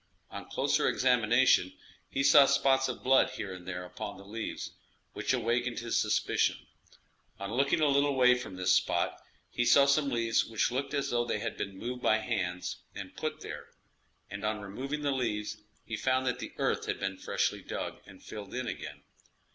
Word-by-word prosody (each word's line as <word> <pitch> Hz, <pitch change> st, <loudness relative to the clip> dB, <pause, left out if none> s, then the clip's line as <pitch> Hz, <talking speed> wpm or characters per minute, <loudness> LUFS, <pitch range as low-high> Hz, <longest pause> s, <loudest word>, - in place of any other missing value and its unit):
On -, -, -8 dB
closer -, -, +1 dB
examination, 120 Hz, -5 st, +3 dB, 0.4 s
he 135 Hz, -, -1 dB
saw 140 Hz, 0 st, +8 dB
spots 135 Hz, -1 st, +3 dB
of 125 Hz, -, -6 dB
blood 135 Hz, +1 st, +5 dB
here 100 Hz, -6 st, -5 dB
and 90 Hz, -1 st, -11 dB
there 90 Hz, -1 st, -4 dB
upon 100 Hz, +2 st, -7 dB
the 100 Hz, -, -13 dB
leaves, 110 Hz, +2 st, -5 dB, 0.4 s
which -, -, -1 dB
awakened 120 Hz, 0 st, 0 dB
his 115 Hz, 0 st, 0 dB
suspicion; -, -, +1 dB, 0.8 s
on 100 Hz, +2 st, -5 dB
looking 140 Hz, +5 st, +2 dB
a 150 Hz, -, +4 dB
little 140 Hz, 0 st, +3 dB
way 125 Hz, -1 st, +6 dB
from 125 Hz, -6 st, -5 dB
this 90 Hz, 0 st, +1 dB
spot, 95 Hz, -, +1 dB, 0.3 s
he 120 Hz, -, 0 dB
saw 140 Hz, +3 st, +6 dB
some 140 Hz, +1 st, +3 dB
leaves 115 Hz, -3 st, +2 dB
which 115 Hz, +1 st, 0 dB
looked 135 Hz, +3 st, -2 dB
as 140 Hz, -, -1 dB
though 120 Hz, 0 st, +2 dB
they 120 Hz, -, -1 dB
had 115 Hz, +1 st, -4 dB
been 95 Hz, -1 st, -5 dB
moved 125 Hz, +4 st, -5 dB
by 110 Hz, -, +4 dB
hands 95 Hz, -6 st, -3 dB, 0.2 s
and -, -, -8 dB
put -, -, -4 dB
there, -, -, -7 dB, 0.6 s
and 100 Hz, +1 st, -7 dB
on 105 Hz, 0 st, -1 dB
removing 135 Hz, +9 st, -5 dB
the 145 Hz, -, +1 dB
leaves, 105 Hz, -5 st, -2 dB, 0.3 s
he 115 Hz, -, -4 dB
found 130 Hz, +3 st, +1 dB
that 125 Hz, -1 st, -1 dB
the -, -, -7 dB
earth -, -, 0 dB
had -, -, -2 dB
been 95 Hz, 0 st, -2 dB
freshly -, -, -1 dB
dug -, -, -5 dB
and -, -, -15 dB
filled 105 Hz, +1 st, -8 dB
in 130 Hz, 0 st, -2 dB
again. -, -, -6 dB
120 Hz, 185 wpm, -30 LUFS, 105-130 Hz, 0.8 s, saw